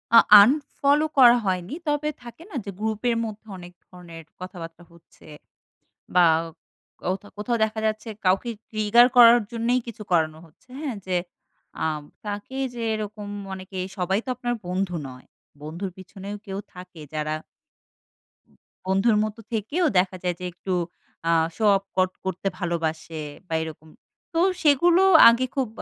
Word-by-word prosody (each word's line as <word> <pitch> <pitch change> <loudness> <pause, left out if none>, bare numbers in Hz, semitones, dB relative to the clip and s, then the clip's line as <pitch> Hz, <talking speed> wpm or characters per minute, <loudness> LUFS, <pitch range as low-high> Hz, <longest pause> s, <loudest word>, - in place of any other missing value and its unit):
আ - - +12 0.2
unfollow 285 +4 +2
করা 245 -2 +8
হয়নি। 185 +4 -2
তবে 295 +1 0
থাকে 240 +4 -12
না - - -9
যে, - - -5
গ্রুপ 220 -1 -2
এর 230 - +1
মধ্যে 220 0 -9
অনেক 175 0 -11
ধরণের 170 -3 -12 0.2
কথাবার্তা 175 -2 -9
হচ্ছে 170 -1 -21 0.9
বা 180 -1 +6 0.8
কোথাও, 190 +3 -3
কোথাও 235 +3 -1
দেখা 220 0 -3
যাচ্ছে 215 +1 -2 0.2
কাউকে 190 +6 +2 0.2
ট্রিগার 215 +3 +5
করার 240 0 +9
জন্যই 235 +2 +1
কিছু 230 -2 -8
করানো 155 -2 +2
হচ্ছে। 165 +11 -27
হ্যাঁ, 275 -8 -4
যে, 185 - 0 0.7
আ - - +1 0.4
তাকে 205 +6 -5 0.2
যে, 235 - -5
এরকম 210 -1 -6 0.3
অনেকে 190 0 -8 0.2
সবাই 190 +3 +1
তো - - -13
আপনার 240 0 -2
বন্ধু 180 0 -2
নয়। 130 0 -13 0.4
বন্ধুর 170 +5 -5
পেছনেও 195 +2 -8
কেউ 195 0 -5 0.2
থাকে 180 -2 -12
যারা 155 0 -2 1.5
বন্ধুর 195 +4 +3
মত 215 0 -3 0.2
থেকেও 285 - 0
দেখা 185 0 -1
যায়, 180 -1 -1
যে, 180 - -6
একটু 185 +2 -4 0.6
আ - - +4 0.2
শো 220 - -4
অফ 195 - -11
কট 185 0 +3
করতে 190 +1 -3
ভালোবাসে, 160 -2 -3 0.3
বা 165 - -5
এরকম। 160 0 -10 0.4
তো 330 - +1 0.2
সেগুলো 335 +5 +4 0.3
আগে 240 +2 +2
খুব 265 -3 0
200 Hz, 145 wpm, -24 LUFS, 180-235 Hz, 1.5 s, আ